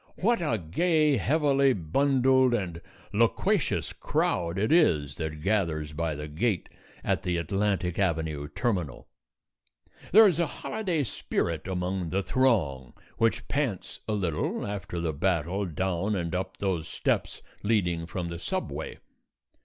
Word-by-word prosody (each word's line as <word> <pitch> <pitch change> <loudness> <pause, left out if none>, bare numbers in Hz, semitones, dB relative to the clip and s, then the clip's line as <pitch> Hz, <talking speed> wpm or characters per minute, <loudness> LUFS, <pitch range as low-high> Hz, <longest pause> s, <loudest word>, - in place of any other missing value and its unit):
What 230 +3 +2
a 150 -9 +1
gay, 150 - +2
heavily 140 +2 +3
bundled, 130 - +3
and 85 -6 -3 0.3
loquacious - - +1
crowd 85 +1 -1
it 105 +6 +1
is 75 - +3
that 75 -2 -4
gathers 80 -7 0
by 80 0 -2
the 75 +1 -6
gate 95 +6 -1 0.3
at - - 0
the 90 -3 -1
Atlantic 95 +1 -1
Avenue 80 -6 0
terminal. 90 - -2 1.0
There 220 +4 +9
is 175 -5 +3
a 170 - +2
holiday 180 -6 -2
spirit 85 - -2
among 90 -1 -2
the 95 +4 0
throng, 90 - +1 0.3
which 115 -1 +1
pants 135 -10 -2
a 110 - 0
little 90 -7 -1
after 95 -4 -4
the 85 -2 -1
battle 90 +4 0
down 95 +4 -1
and 85 -3 -2
up 95 +1 -3
those 90 -5 -1
steps - - -1 0.2
leading 90 -6 +1
from 85 0 -4
the 85 0 -6
subway. - - -4
95 Hz, 135 wpm, -28 LUFS, 85-120 Hz, 1.0 s, There